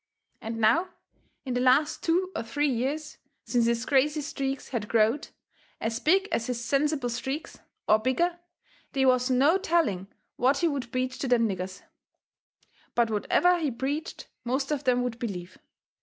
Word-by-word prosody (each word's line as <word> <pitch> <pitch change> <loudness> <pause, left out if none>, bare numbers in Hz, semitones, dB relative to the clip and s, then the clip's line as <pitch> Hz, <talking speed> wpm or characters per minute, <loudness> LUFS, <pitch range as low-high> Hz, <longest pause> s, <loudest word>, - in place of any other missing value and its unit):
And 225 +1 -5
now, 230 +12 +3 0.6
in 255 - -2
the 245 - 0
last 270 +4 +3
two 365 +3 +1
or - - -1
three 260 +6 -1
years, 275 +5 -2 0.3
since 240 -2 +2
his 235 +1 0
crazy 295 +2 +2
streaks 275 -2 -4
had 230 -5 -3
growed 225 +6 +2 0.5
as 225 +1 -2
big 380 +7 +3
as 230 - -1
his 250 -2 -2
sensible 280 0 +1
streaks, 265 +6 -4 0.3
or 215 - +5
bigger, 340 +9 0 0.5
they 270 -1 +2
was 255 0 +3
no 280 +8 +4
telling 310 - +1 0.3
what 265 +3 +3
he 340 - +2
would 275 -6 -3
preach 255 0 -2
to 270 - -2
them 240 -2 +3
niggers. 185 -1 -5 1.1
But 235 -2 +2
whatever 350 - +3
he 310 -3 0
preached 280 - -4 0.2
most 265 +4 -1
of 290 -2 -2
them 250 -1 +3
would 240 -2 -4
believe. 185 -6 -6
260 Hz, 160 wpm, -27 LUFS, 230-295 Hz, 1.1 s, or